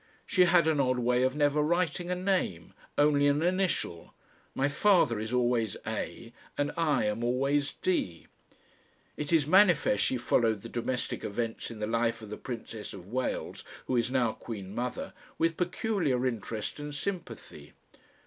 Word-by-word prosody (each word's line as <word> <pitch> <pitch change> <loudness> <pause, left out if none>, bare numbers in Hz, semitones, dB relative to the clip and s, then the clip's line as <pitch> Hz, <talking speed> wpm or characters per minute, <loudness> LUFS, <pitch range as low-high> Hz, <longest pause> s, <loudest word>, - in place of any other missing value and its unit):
She 185 -3 +4
had 170 -2 +4
an 155 -2 +2
odd 130 -2 +2
way 125 0 +2
of 130 +1 +1
never 145 0 +2
writing 175 +2 0
a 180 - 0
name, 180 - -1 0.2
only 145 -1 +4
an 145 +2 +2
initial; 180 - -1 0.4
my 135 - +2
father 145 - +3
is 110 +1 -4
always 120 -4 +1
"A.," 115 +2 -5 0.2
and 145 0 0
I 155 -7 +2
am 105 +2 -1
always 135 +4 +1
"D." 95 - -1 0.9
It 150 +1 -4
is 160 -4 +4
manifest 175 - +4
she 130 - +1
followed 115 -3 +1
the 115 - -7
domestic 120 +1 -2
events 115 +2 -3
in 115 - -8
the 105 - -2
life 115 0 0
of 105 - -9
the - - -5
Princess 115 -3 -7
of 95 -1 -11
Wales, 130 +3 -3 0.2
who 130 - -1
is 120 0 +1
now 125 -3 +2
Queen 100 -4 -8
Mother, 120 +2 -4 0.2
with 165 0 +1
peculiar 175 - 0
interest 115 0 -3
and 145 0 -6
sympathy. 180 +5 -6
130 Hz, 160 wpm, -29 LUFS, 115-160 Hz, 0.9 s, She